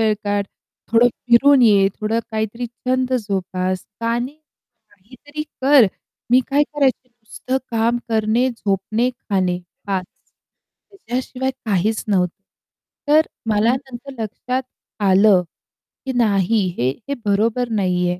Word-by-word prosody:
वेळ 220 -1 +3
काढ. 205 0 0 0.5
थोडं 235 +2 +6
फिरून 250 +3 +4
ये, 200 -4 +5
थोडं 220 +2 0
काहीतरी 220 +2 -3
छंद 255 +2 -2
जोपास, 185 -1 -2 0.2
का 230 +1 0
नाही. 260 +5 -5 0.5
काहीतरी 260 +9 -9 0.2
कर." 270 -5 +6 0.4
मी 255 - +7
काय 285 +2 +4
करायची? 275 -4 0
नुसतं 240 +2 -4
काम 230 +1 +1
करणे, 225 +3 +2
झोपणे, 215 +1 -1
खाणे 185 -5 0 0.3
बास. 190 -2 -1 0.8
त्याच्याशिवाय 260 - -3
काहीच 215 +2 0
नव्हतं. 185 -2 0 0.7
तर 310 +2 +4 0.2
मला 220 +3 +3
नंतर 265 0 -9
लक्षात 250 +5 -3 0.4
आलं 195 0 +5 0.6
की 265 - -2
नाही 205 -2 +2
हे, 125 +2 +1 0.2
हे - - 0
बरोबर 220 +4 +1
नाही 180 -4 +1
आहे. 180 - -3
225 Hz, 120 wpm, -20 LUFS, 200-255 Hz, 0.8 s, मी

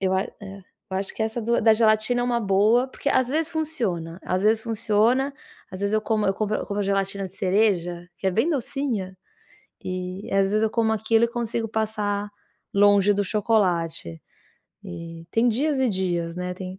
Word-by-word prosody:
eu 190 -1 +1
a 190 - +2
eh, 195 -1 -11 0.3
eu 190 - -2
acho 195 - -4
que 220 - -2
essa 220 +2 -2
do 235 +2 +1
da 220 0 +6
gelatina 220 +2 +2
é - - 0
uma 240 -1 +1
boa, 215 +5 +3
porque 280 - -4
às 260 -1 +2
vezes 315 +4 0
funciona, 210 - -2
às 185 +1 -1
vezes 220 +1 +3
funciona, 230 +5 +1 0.4
às 185 +1 -8
vezes 200 +1 -1
eu 215 - +3
como 215 -1 0
eu 195 - +3
compro 215 0 -1
eu - - -5
compro 205 0 -2
gelatina 195 0 -1
de 185 - -14
cereja, 180 -3 +1
que - - -3
é - - +1
bem 225 - +2
docinha, 245 - -2 0.7
e 185 +1 -5
às 195 0 +3
vezes 215 +1 +1
eu 220 - +1
como 225 -1 +1
aquilo 220 +1 +2
e - - +1
consigo 230 -1 -3
passar 210 -2 -2 0.5
longe 205 0 +5
do 205 - +1
chocolate. 180 - 0 0.6
E 165 - -8
tem 235 +2 +3
dias 280 +5 0
e 260 - +3
dias, 175 -4 -2
né, 180 0 -3
tem 185 0 -7
210 Hz, 195 wpm, -24 LUFS, 190-230 Hz, 0.7 s, da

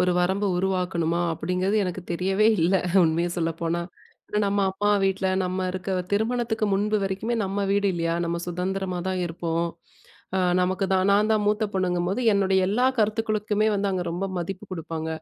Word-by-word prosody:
ஒரு 180 - +3
வரம்பு 190 +3 +1
உருவாக்கணுமா? 180 -3 0
அப்பிடிங்கிறது 180 +5 -1
எனக்கு 180 0 -4
தெரியவே 190 +5 +2
இல்ல, 175 +4 +3 0.3
உண்மைய 165 +2 +1
சொல்லப்போனா. 165 +1 -1 0.6
நம்ம 200 0 +1
அப்பா 205 +2 0
வீட்ல 195 0 0 0.2
நம்ம 185 +1 -2
இருக்க 185 +1 -5 0.2
திருமணத்துக்கு 220 0 0
முன்பு 210 +2 +1
வரைக்குமே 195 +5 -2
நம்ம 200 +1 -1
வீடு 200 0 +2
இல்லயா! 165 -1 -1
நம்ம 170 0 -1
சுதந்திரமா 185 +1 -2
தான் 185 -1 -1
இருப்போம். 170 0 -2 0.7
அ - - +2 0.2
நமக்கு 185 +2 0
தான் 190 +1 +3
நான் 210 +2 +3
தான் 215 -1 +2
மூத்த 210 +1 +2
பொண்ணுங்கம்போது, 185 +3 0
என்னுடைய 195 -1 +2
எல்லா 240 +6 +2
கருத்துக்களுக்குமே 215 0 +1
வந்து 200 0 0
அங்க 185 -2 -1
ரொம்ப 180 +3 -3
மதிப்பு 190 +3 -5
கொடுப்பாங்க. 165 -2 -4
190 Hz, 155 wpm, -25 LUFS, 175-205 Hz, 0.7 s, ஒரு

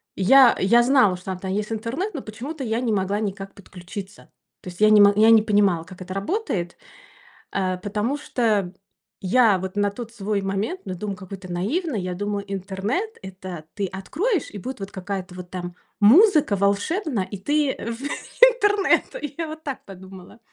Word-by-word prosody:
Я 255 +6 +6
я 235 +5 +4
знала, 245 -8 +4
что 185 +1 -6
он 185 - -5
там 190 0 -4
есть, 210 +2 -2
интернет, 250 - -3
но 285 - -5
почему-то 265 +7 -7
я 225 0 -1
не 240 -3 -1
могла 200 +1 0
никак 195 -2 -4
подключиться. 190 +1 -10 0.3
То 180 - -8
есть 175 - -12
я 215 - +7
не 210 -1 +7
мог 205 0 +6
я 220 +1 +6
не 220 -1 +7
понимала, 200 -6 +2
как 185 0 -13
это 185 +1 -7
работает. 195 - -3 0.8
А, 185 -2 -1
потому 210 +8 -2
что 220 -10 0 0.5
я 210 0 +4
вот 190 +1 -5
на 205 0 +2
тот 230 +2 -8
свой 205 -2 -2
момент, 200 - -2
ну, 185 -2 -5
дум, 200 +1 -5
какой 195 -1 -9
ты 185 -1 -11
наивный, 240 - -1
я 180 0 -4
думаю: 205 +1 -3
"Интернет- 200 - -3
это 185 -4 -8
ты 200 -1 -2
откроешь, 300 - -2
и 205 - -8
будет 255 +6 -6
вот 195 +1 -6
какая-то 190 -1 -5
вот 180 -1 -9
там 175 -1 -6 0.3
музыка 300 - +6
волшебная, 205 - 0
и 200 0 -8
ты 290 +5 0
в 230 +3 -5 0.4
интернет". 415 -5 +2
И 295 -2 -5
я 325 -2 -2
вот 315 +1 -9
так 275 -3 -5
подумала. 190 +1 -12
205 Hz, 185 wpm, -23 LUFS, 190-255 Hz, 0.8 s, я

